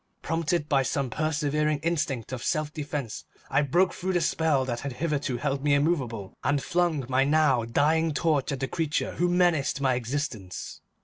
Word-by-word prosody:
Prompted 165 0 0
by 140 -3 +3
some 135 -1 -1
preserving 150 +1 0
instinct 145 -9 -1
of 130 -2 -5
self 155 -1 -1
defense, 145 -6 -4 0.3
I 135 +2 +4
broke 175 +7 +2
through 190 +1 -2
the 175 - +2
spell 155 -6 +1
that 120 -2 -3
had 140 -2 -5
hitherto 145 -2 -1
held 140 +1 -2
me 145 -1 +4
immovable, 130 - -1
and 145 - +2
flung 170 -6 +1
my 130 +1 +3
now 140 -5 +3
dying 155 +7 +2
torch 150 -2 +1
at 135 -1 -4
the 135 - 0
creature 155 +1 -1
who 175 0 +2
menaced 175 -6 +2
my 135 -2 +2
existence. 120 -6 -4
145 Hz, 175 wpm, -27 LUFS, 130-160 Hz, 0.3 s, I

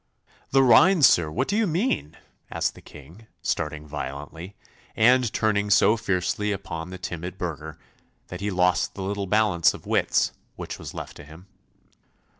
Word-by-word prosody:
'The 135 0 +4
rhine, 150 +8 +6
sir! 85 -10 +5
What 75 - -2
do 200 - -1
you 220 -1 +2
mean?' 175 - -1 0.3
asked - - -1
the - - -15
King, 85 +11 -15 0.2
starting 75 -2 -2
violently, 75 +5 -7 0.4
and 125 +1 +4
turning 105 -2 0
so 105 +2 +5
fiercely 105 +1 -1
upon 85 -4 -5
the 95 - -7
timid 90 0 -6
burgher, 80 -3 -6 0.5
that 90 +1 -7
he 105 - -1
lost 90 -1 +1
the 95 - -5
little 100 0 -3
balance 105 -5 +3
of - - -13
wits - - +1 0.2
which - - -7
was - - -9
left - - -8
to - - -11
him. 80 +5 -14
95 Hz, 160 wpm, -25 LUFS, 80-110 Hz, 0.5 s, rhine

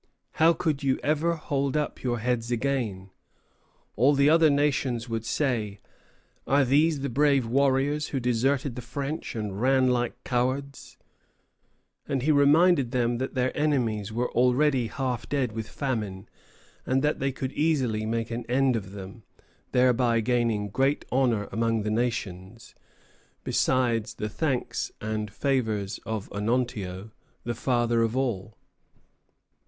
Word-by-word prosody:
How 165 +1 +7
could 160 -4 -1
you 135 -2 +1
ever 155 +3 +1
hold 140 -2 -1
up 150 - -3
your 120 -2 -1
heads 120 0 -1
again? 115 -7 -2 0.8
All 135 +6 +4
the 140 +2 +4
other 165 -1 +5
nations 135 -5 0
would 115 -1 -3
say: 110 -5 -1 0.7
'Are 140 0 +4
these 145 +3 +3
the 140 - -1
brave 140 0 +3
warriors 140 +4 +1
who 135 - -2
deserted 125 +3 0
the 125 - -5
French 140 +5 -5
and 105 -2 -4
ran 130 0 +3
like 120 0 -1
cowards?'" 130 +2 -2 1.1
And 135 -2 -1
he 155 - +3
reminded 145 0 +4
them 120 -1 0
that 130 +1 -4
their 130 0 0
enemies 120 -9 0
were 120 +3 -2
already 125 +1 +2
half 125 -1 -3
dead 135 -4 0
with 110 0 -5
famine, 105 -8 -3 0.6
and 130 +2 0
that 150 +1 +1
they 135 +1 0
could 130 0 -4
easily 130 -9 +1
make 115 +1 -2
an 120 +1 -3
end 130 0 +2
of 100 -3 -5
them, 100 +3 -9 0.5
thereby 125 -2 +3
gaining 115 -3 0
great 135 +7 0
honor 120 -6 +1
among 115 0 0
the 105 - -2
nations, 110 -3 -3 0.7
besides 120 -4 +1
the 105 - -4
thanks 135 +2 -2
and 110 0 -3
favors 110 -4 -1
of 110 -3 -3
Onontio, 105 -3 -2 0.3
the 120 - -2
father 120 -1 +1
of 115 +2 0
all. 115 -6 -2
125 Hz, 140 wpm, -26 LUFS, 115-140 Hz, 1.1 s, How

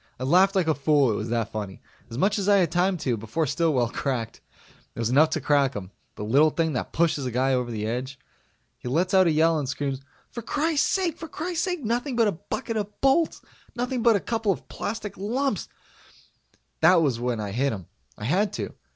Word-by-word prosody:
I - - -4
laughed 185 +8 +4
like 185 -4 +2
a 160 - +4
fool 145 -3 +3
it - - -1
was 110 +2 -4
that 115 -2 -1
funny. 105 -3 -5 0.3
As 115 - -7
much 200 +8 +2
as 200 +1 0
I 200 - +6
had 180 -4 +2
time 180 +2 +2
to, 125 -7 -1
before 110 +9 -2
Stillwell 150 -8 +1
cracked. 120 -3 -3 0.5
It - - -8
was 115 0 0
enough 150 +4 +5
to 155 -1 -2
crack 140 -1 +2
him 95 -2 -6 0.2
the - - -6
little 140 +9 +4
thing 160 0 -1
that 125 - -3
pushes 155 -5 +1
a - - -1
guy 130 +3 +1
over 125 -1 0
the 110 -2 -3
edge. 125 +4 -3 0.6
He - - -8
lets 170 +9 0
out 190 -2 +6
a - - +3
yell 160 +1 +3
and 135 -3 -3
screams, 135 0 -3 0.3
"For 235 - -6
crisake! 325 - 0
For 325 - -6
crisake! 350 0 -3
Nothing 245 +4 -1
but 230 -2 +3
a - - +2
bucket 225 +7 -4
of 210 -1 -5
bolts! 275 +5 +2 0.3
Nothing 245 0 -2
but 230 -1 +5
a - - +2
couple 225 0 -1
of - - -5
plastic 210 -1 -5
lumps 255 +8 -1 0.6
" - - -40
That 170 +1 +6
was 130 -6 0
when 120 -2 -1
I 105 -2 -4
hit 135 +6 0
him. 95 -5 -6 0.3
I - - -9
had 195 - +1
to. - - -4
160 Hz, 220 wpm, -25 LUFS, 125-210 Hz, 0.6 s, I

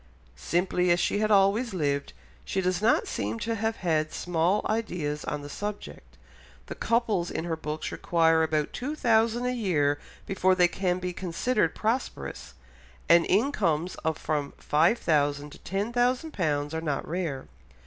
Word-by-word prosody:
Simply 180 - 0
as 175 0 +4
she 205 - +1
had 215 0 +1
always 205 +2 +3
lived, 140 -4 -1 0.3
she 195 - -2
does 185 0 0
not 225 +2 +3
seem 105 +3 -3
to 230 - -1
have 225 +1 -1
had 155 -5 0
small 180 +4 0
ideas 175 -10 -2
on 150 -1 -3
the - - -7
subject, 75 - -7 0.5
the - - -6
couples 220 -7 0
in - - -3
her 170 -1 -2
books 155 -1 -4
require 165 -1 +2
about 155 -2 0
two 285 +5 -3
thousand 230 -2 +2
a 250 - +1
year 150 -11 +1 0.3
before 185 -1 +2
they 180 -1 +5
can 180 0 -1
be 180 0 -4
considered 185 +2 0
prosperous, 230 +4 -3 0.5
and 170 0 +6
incomes 185 - +1
of 160 -2 0
from 145 -2 -2
five 165 +10 +3
thousand 145 -3 0
to - - -13
ten 200 +5 -3
thousand 250 +6 +1
pounds 150 -4 -1
are 160 - -2
not 150 -4 -2
rare. 160 -6 -3
180 Hz, 160 wpm, -27 LUFS, 155-215 Hz, 0.5 s, and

